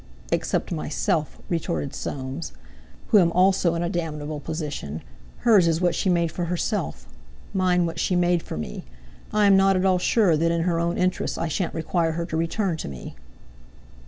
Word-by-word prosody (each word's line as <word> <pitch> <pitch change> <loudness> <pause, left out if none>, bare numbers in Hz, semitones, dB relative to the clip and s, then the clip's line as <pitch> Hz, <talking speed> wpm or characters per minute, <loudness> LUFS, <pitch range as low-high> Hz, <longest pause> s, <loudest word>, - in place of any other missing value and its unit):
"Except - - 0
myself," 155 0 -1
retorted 115 - -2
Soames, 135 +4 -5 0.6
"who 215 - +7
am 170 -3 +4
also 185 -2 +3
in 170 - -1
a - - 0
damnable 155 -4 -3
position. 145 - -5 0.4
Hers 205 -7 +5
is 165 -1 +2
what 175 -1 +2
she 190 - 0
made 170 -2 +2
for 175 +1 -3
herself; 180 +5 -2 0.5
mine 180 -2 +2
what 165 - -4
she 185 - +1
made 175 -1 +2
for - - -6
me. 75 -5 -5 0.5
I 210 -1 +3
am 200 -1 +6
not 195 0 +5
at 185 +1 +1
all 185 -1 +3
sure 190 -3 +3
that 165 +2 +2
in 170 0 +1
her 170 -1 +1
own 170 +1 0
interests 185 0 0
I 165 - -2
shan't 175 +3 -2
require 165 0 0
her 170 +1 -2
to 165 - -5
return 165 +2 0
to - - -5
me." 65 -3 -8
170 Hz, 185 wpm, -24 LUFS, 160-185 Hz, 0.6 s, who